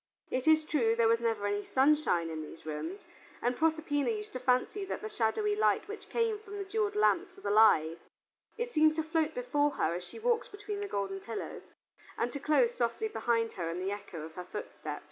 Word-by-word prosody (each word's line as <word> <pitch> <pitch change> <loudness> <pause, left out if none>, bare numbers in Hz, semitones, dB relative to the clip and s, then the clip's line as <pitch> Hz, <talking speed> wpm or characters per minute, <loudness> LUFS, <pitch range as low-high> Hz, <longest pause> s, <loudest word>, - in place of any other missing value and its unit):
It 255 +3 -1
is 315 0 +6
true 235 -8 +2
there 230 -1 +4
was 230 0 +4
never 225 -3 0
any 205 0 0
sunshine 265 - +2
in 160 -1 -4
these 155 +1 -10
rooms, 320 - -5 0.3
and 245 +1 0
Proserpina 315 - +1
used 430 -1 -4
to 255 - -3
fancy 255 +10 +1
that - - -4
the 435 - -3
shadowy 415 - +1
light 425 - +2
which 425 +1 -8
came 455 -2 0
from 410 -1 -9
the 400 - -4
jeweled 415 +1 -1
lamps 375 -3 +2
was - - -15
alive: 200 -6 +5 0.6
it 475 +1 -3
seemed 310 0 +5
to 320 - 0
float 320 +1 0
before 295 -13 +1
her 165 - +1
as 175 +1 -4
she - - -11
walked 460 0 +1
between 410 0 -5
the 405 - -3
golden 195 - -2
pillars, 225 +3 -6 0.6
and 240 - -1
to 285 - -3
close 270 -5 +3
softly 240 - -1
behind 230 - 0
her 170 -3 -3
in 170 +2 -3
the 190 +2 -2
echo 200 -6 -6
of 160 0 -9
her 180 +2 -7
footsteps. 210 +3 -6
280 Hz, 210 wpm, -31 LUFS, -, 0.6 s, is